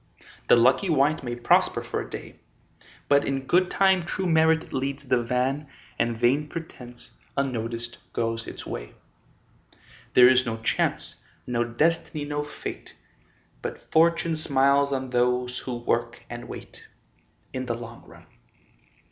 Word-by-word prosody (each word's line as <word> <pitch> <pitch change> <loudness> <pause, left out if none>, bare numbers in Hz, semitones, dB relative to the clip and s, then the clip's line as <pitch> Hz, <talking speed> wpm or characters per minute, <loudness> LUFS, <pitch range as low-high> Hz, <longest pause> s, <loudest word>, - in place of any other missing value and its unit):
The - - +7
lucky 130 +10 +4
wight 150 0 +3
may 120 -1 -3
prosper 120 - +2
for - - -3
a - - -8
day, - - -9 0.7
But 140 0 +4
in 135 -1 -2
good 180 +5 +3
time 190 -2 +4
true 185 +2 -3
merit 160 -1 +3
leads 135 +1 -2
the 125 -1 +3
van 130 +5 -1 0.3
And 115 0 +1
vain 135 +6 +2
pretence, 125 -7 -9 0.2
unnoticed, 120 -3 -3
goes 115 0 -2
its - - -8
way. - - -7 1.2
There 125 -1 +9
is 130 0 +5
no 115 -3 -3
Chance, - - 0 0.3
no 120 -1 0
Destiny, 150 +5 0
no 145 0 -2
Fate, 150 - -8 0.7
But - - -7
Fortune 165 0 +3
smiles 140 -1 +3
on 130 -2 -2
those 125 0 +1
who 125 - -5
work 120 0 -1
and 120 0 -7
wait, - - -10 0.7
In 130 0 -4
the 120 - -1
long 115 0 -9
run. - - -15
130 Hz, 140 wpm, -26 LUFS, 120-150 Hz, 1.2 s, There